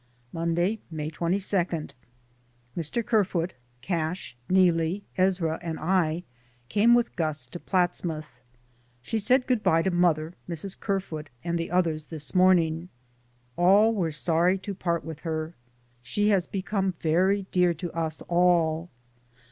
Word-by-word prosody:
Monday, 170 +5 0
May 155 -1 -4
22. 185 +5 0 1.2
Mr. 175 +8 -2
Kerfoot, 185 -6 +1 0.3
Cash, 170 -4 -2
Neelie, 180 0 +3
Ezra 180 -4 +1
and 165 -2 -4
I 170 -1 +1 0.5
came 230 - +5
with 240 -1 0
Gus 155 -5 -1
to 150 +7 -9
Platsmouth. 175 -4 -1 0.6
She 225 - -1
said 250 +5 +3
good 250 -4 +1
bye 165 -5 +3
to 190 - +1
mother, 170 -2 +2 0.2
Mrs. 180 +3 -5
Kerfoot 165 -6 -3
and 170 0 -1
the 165 - -3
others 165 -4 0
this 150 -4 -3
morning. 180 -2 +3 0.7
All 200 +6 +5
were 180 -7 0
sorry 170 +4 +2
to 195 +1 -6
part 170 -3 -2
with 160 -2 -7
her. 160 0 -3 0.5
She 205 - 0
has 190 -4 +2
become 195 -1 -2
very 185 +5 +2
dear 180 -2 +3
to 170 +1 -5
us 160 -1 -2
all. 170 -1 +2
175 Hz, 130 wpm, -27 LUFS, 160-190 Hz, 1.2 s, came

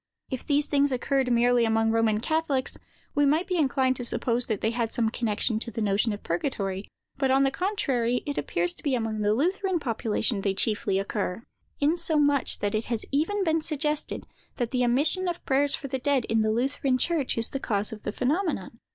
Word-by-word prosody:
If 260 - -3
these 290 0 +2
things 285 -1 +2
occurred 260 0 0
merely 240 0 +4
among 225 0 +2
the - - 0
Roman 220 -2 +2
catholics, 300 -2 0 0.4
we 290 - +2
might 305 +5 +3
be 365 -2 -1
inclined 265 -4 +2
to 245 - -4
suppose 240 0 -1
that 215 -4 -1
they 220 - +1
had 235 -1 -1
some 225 -2 +1
connection 220 -1 0
with 235 - -9
their 225 - -1
notion 205 +3 +1
of 205 - -6
purgatory: 195 0 -2 0.3
but, 270 -1 +1
on 270 +1 +4
the 270 - +2
contrary, 265 - 0
it 285 - -3
appears 175 +1 0
to - - -12
be 280 -3 0
among 225 -2 -2
the 205 0 +2
Lutheran 370 - 0
population 225 -4 0
they 195 -1 0
chiefly 205 -2 +1
occur—insomuch 285 - 0
that 205 0 0
it 215 +1 -1
has 230 -2 -2
even 330 +9 +1
been 325 -2 +1
suggested 300 -1 -2 0.3
that 240 -3 -2
the 250 -1 +1
omission 295 +10 +2
of 350 -1 -4
prayers 275 +1 +3
for 275 - -7
the 265 0 -3
dead, 275 -2 +1
in 225 0 +1
the 215 - +1
Lutheran 255 +3 +1
church, 295 -2 0
is 230 - 0
the 275 - -4
cause 210 -4 -2
of 215 - -9
the - - -3
phenomenon. 265 - -1
255 Hz, 205 wpm, -26 LUFS, 225-290 Hz, 0.4 s, merely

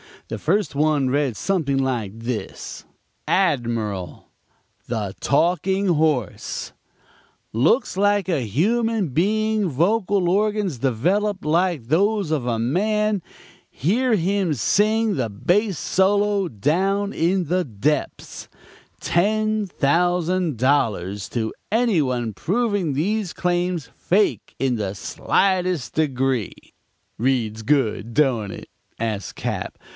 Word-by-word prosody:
The 110 - -4
first 195 - 0
one 145 -2 +2
read 140 -3 0
something 165 -8 0
like 120 -6 -1
this: 115 -3 -5 0.4
ADMIRAL 115 - -1 0.6
THE 105 -5 -3
TALKING 185 +6 +1
HORSE 150 - 0 0.8
TALKS 165 - +2
LIKE 205 -1 +2
A 140 -10 0
HUMAN 220 - +1
BEING 215 +6 +1
VOCAL 190 - +1
ORGANS 205 - 0
DEVELOPED 185 - 0
LIKE 165 -5 +1
THOSE 200 +1 +2
OF 145 -6 0
A 115 -2 0
MAN 210 - +1 0.5
HEAR 225 - +1
HIM 190 -2 +1
SING 210 - +2
THE 120 -4 -1
BASS 185 - +1
SOLO 200 0 +2
"DOWN 190 - 0
IN 180 +3 +1
THE 180 0 +1
DEPTHS" 135 +5 -2 0.5
TEN 215 +3 +1
THOUSAND 175 0 +1
DOLLARS 105 -7 0
TO 110 -2 -2 0.2
ANY 225 -6 +3
ONE 120 -5 -1
PROVING 200 - 0
THESE 195 +6 -1
CLAIMS 175 -6 -1
FAKE 200 +3 0
IN 130 -3 0
THE 100 -2 -3
SLIGHTEST 185 - 0
DEGREE 135 -7 0 0.6
"'Reads 115 -3 0
good, 115 -4 0
don't 125 -9 +2
it?' - - -9 0.3
asks 110 -3 -3
Cap. - - -4
165 Hz, 110 wpm, -22 LUFS, 125-200 Hz, 0.8 s, ANY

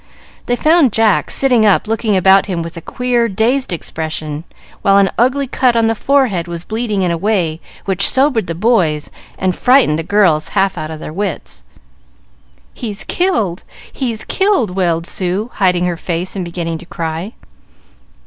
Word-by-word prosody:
They 245 - +1
found 310 -1 +4
Jack 220 -3 +2
sitting 250 -5 +2
up 210 0 +3
looking 220 -2 0
about 190 +2 +5
him 175 -4 -2
with 165 0 -8
a 170 - -7
queer, 245 +4 0
dazed 230 +5 0
expression, 155 -2 -5 0.4
while 195 0 +4
an 195 -1 +3
ugly 260 +4 +2
cut 255 -1 +1
on 230 -1 +3
the 225 - +2
forehead 225 -8 +1
was 170 -1 -6
bleeding 215 -1 -2
in 180 - +1
a 170 - -2
way 175 -6 0 0.2
which 195 0 +2
sobered 260 -7 +1
the 165 - -3
boys 175 -7 +1 0.3
and 185 -1 0
frightened 250 - +3
the - - -3
girls 165 -5 +2
half 195 0 +2
out 155 0 -5
of 160 -1 -7
their 155 - -7
wits. 195 +1 -5 1.1
"He's 215 -4 -5
killed! 225 - -1 0.3
He's 235 -5 -3
killed!" 385 - +1
wailed 170 -3 0
Sue, 190 +6 -2
hiding 180 -3 +1
her 175 -1 -1
face 175 +3 -3
and 190 - -3
beginning 170 -1 -4
to 175 - -13
cry. 165 +6 -4
195 Hz, 170 wpm, -16 LUFS, 170-235 Hz, 1.1 s, about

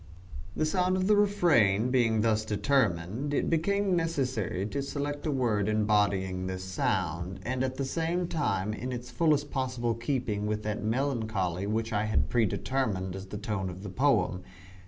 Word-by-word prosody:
The 155 - +1
sound 185 +3 +1
of 185 - 0
the 210 +2 +5
refrain 145 - +3
being 115 -4 +3
thus 110 -1 +2
determined, 110 - 0
it - - 0
became 195 +4 +2
necessary 130 - -1
to 140 +7 -2
select 145 +2 -3
a - - +1
word 110 -7 +1
embodying 100 -4 +1
this 95 0 -4
sound, 90 -1 -2
and 130 +2 -1
at 130 0 -2
the 135 - -2
same 170 +5 -1
time 105 - -1
in 125 +4 -5
the 125 - -2
fullest 145 +4 0
possible 125 -3 -1
keeping 115 -3 -2
with 105 0 -2
that 105 0 -2
melancholy 110 -6 -1
which 110 +2 -1
I 105 +1 +1
had 105 - +1
pre 115 -3 +3
determined 95 -6 -2
as 95 0 -7
the 105 - -6
tone 100 -3 -3
of 90 +2 -8
the 100 - -5
poem. 105 -6 +2
115 Hz, 170 wpm, -29 LUFS, 100-140 Hz, -, the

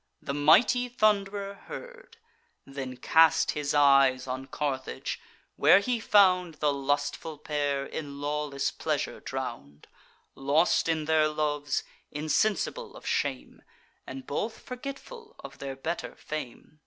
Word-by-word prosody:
The 140 - -4
mighty 225 - +4
Thund'rer 200 -3 +1
heard; - - -11 0.5
Then 135 -2 -6
cast 160 +4 +4
his 150 -1 -2
eyes 135 -3 +5
on 130 +1 -5
Carthage, 135 -3 -3 0.4
where - - +7
he 235 +4 0
found 185 -6 +4
The 150 -1 +1
lustful 145 +3 -2
pair 145 -2 -1
in 140 -2 -6
lawless 145 -1 -2
pleasure - - -2
drown'd, 75 +1 -6 0.5
Lost 150 +5 +2
in 160 -1 0
their 155 -1 +3
loves, 150 -2 -1 0.3
insensible 215 - -1
of - - -13
shame, - - -2 0.5
And 265 -1 -7
both 220 -2 -3
forgetful 285 - -9
of - - -10
their 135 -1 -5
better 160 +6 -4
fame. 155 0 -7
150 Hz, 120 wpm, -28 LUFS, 140-200 Hz, 0.5 s, where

